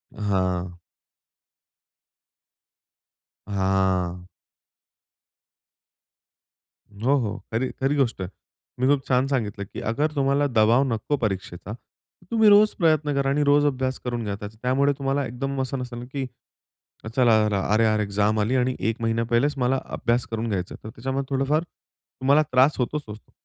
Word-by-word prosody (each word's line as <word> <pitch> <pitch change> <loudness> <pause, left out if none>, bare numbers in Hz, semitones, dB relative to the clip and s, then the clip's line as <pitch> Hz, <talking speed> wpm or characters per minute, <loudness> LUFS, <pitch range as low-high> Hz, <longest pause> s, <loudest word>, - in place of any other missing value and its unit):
हां. 95 -4 -1 2.8
हां. 95 -2 0 2.7
हो, 120 +8 +1
हो. 110 -2 -3
खरी, 120 +3 0
खरी 140 +2 +2
गोष्ट 120 -8 0
आहे. 90 - -4
तुम्ही 130 +6 -2
खूप 135 - -10
छान 130 +1 +2
सांगितलं, 105 -7 -2
की - - -9
"अगर 150 +6 0
तुम्हाला 140 +1 +2
दबाव 115 +2 +4
नको 140 +7 -1
परीक्षेचा, 95 -2 -4
तर 150 +8 -20
तुम्ही 220 -2 +5
रोज 210 +1 +6
प्रयत्न 155 -3 +2
करा 135 0 +1
आणि 145 +1 +2
रोज 145 +1 +4
अभ्यास 130 -2 -1
करून 120 -2 -3
घ्या 100 -1 -3
त्याचा." 105 +1 -8
त्यामुळे 135 +3 +2
तुम्हाला 135 0 -1
एकदम 135 +3 -3
असं 130 +1 -3
नसेल, 120 -1 -6
की 135 -2 -2 0.9
"चला, 120 -4 +5 0.4
अरे-अरे, 110 -1 +3
एक्झाम 105 +2 +1
आली 110 +5 +1
आणि 125 0 +1
1 115 +1 -2
महिना 115 0 0
पहिलेच 140 +5 +3
मला 130 +1 +1 0.2
अभ्यास 120 +1 0
करून 115 +1 -2
घ्यायचा 95 -3 -3
आहे," - - -17
तर 110 - -7
त्याच्यामुळे 135 +3 -3
थोडंफार 140 +4 +1
तुम्हाला 140 -3 -1
त्रास 130 +3 +4
होतोच 145 +5 -1
होतो. 105 0 -11
125 Hz, 140 wpm, -24 LUFS, 110-140 Hz, 2.8 s, रोज